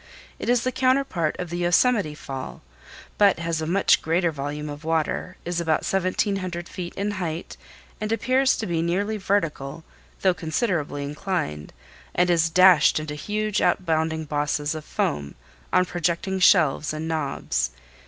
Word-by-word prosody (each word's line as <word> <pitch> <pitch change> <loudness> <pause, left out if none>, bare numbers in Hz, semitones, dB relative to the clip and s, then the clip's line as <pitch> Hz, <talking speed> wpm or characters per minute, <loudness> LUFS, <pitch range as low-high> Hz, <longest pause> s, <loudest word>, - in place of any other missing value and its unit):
It - - -3
is 245 -1 +3
the 255 - 0
counterpart 255 - +1
of 180 -2 -5
the 175 - -3
Yosemite 175 -1 +2
Fall, 135 - -7 0.6
but 200 -2 +5
has 165 -1 -2
a 155 - -3
much 190 +4 +3
greater 170 +1 +1
volume 150 +1 -5
of 145 +1 -7
water, 165 +3 -1
is 175 0 -1
about 160 -2 +1
1700 185 -2 -1
feet 175 -2 -7
in 200 +1 -1
height, 175 -4 -4 0.5
and 215 0 -2
appears 260 +3 +2
to 220 - -3
be 170 -4 -1
nearly 200 +6 0
vertical, 165 -7 -1 0.4
though 190 -1 +4
considerably 160 -4 -2
inclined, 145 - -3 0.4
and 180 0 +3
is 165 -1 +3
dashed 180 -3 +6
into 155 -1 -5
huge 210 +7 -2
outbounding 160 -2 0
bosses 145 +1 -1
of 155 -1 -7
foam 70 0 -2 0.4
on 185 - +4
projecting 175 +2 -1
shelves 155 -5 +4
and 155 +1 -4
knobs. 140 - -1
170 Hz, 150 wpm, -24 LUFS, 155-190 Hz, 0.6 s, dashed